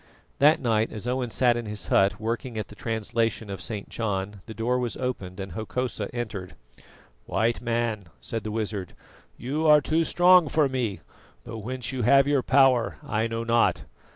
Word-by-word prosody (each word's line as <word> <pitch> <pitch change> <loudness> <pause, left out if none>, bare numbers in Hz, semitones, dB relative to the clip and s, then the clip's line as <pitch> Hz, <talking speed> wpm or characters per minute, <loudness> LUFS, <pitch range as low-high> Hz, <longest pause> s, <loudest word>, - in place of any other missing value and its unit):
That 150 +3 +5
night 115 -3 +1
as 110 0 -6
Owen 125 0 -1
sat 120 +1 +3
in 120 -2 -4
his 105 0 -5
hut 95 0 +3
working 115 +2 -3
at 110 - -4
the 105 - -12
translation 115 -1 -2
of 95 - -6
St. 105 -3 -4
John, 100 -2 -3
the 110 - -7
door 125 +3 0
was 120 -2 -3
opened 100 -8 -4
and 95 -1 -5
Hokosa 110 +2 -3
entered. 110 -6 -5 0.7
"White 115 +1 0
Man," 115 -4 -1
said 115 -1 -5
the 110 - -4
wizard, 105 -4 -4 0.4
"you 150 +6 -1
are 150 0 +8
too 160 +3 +1
strong 175 +1 +5
for 155 -3 +3
me, 120 -9 -2 0.4
though 115 - -7
whence 125 +4 -4
you 130 -2 -3
have 135 +4 +5
your 145 -2 +2
power 130 -3 +3
I 110 +1 -1
know 115 0 -3
not. 115 0 +2
115 Hz, 180 wpm, -26 LUFS, 105-130 Hz, 0.7 s, are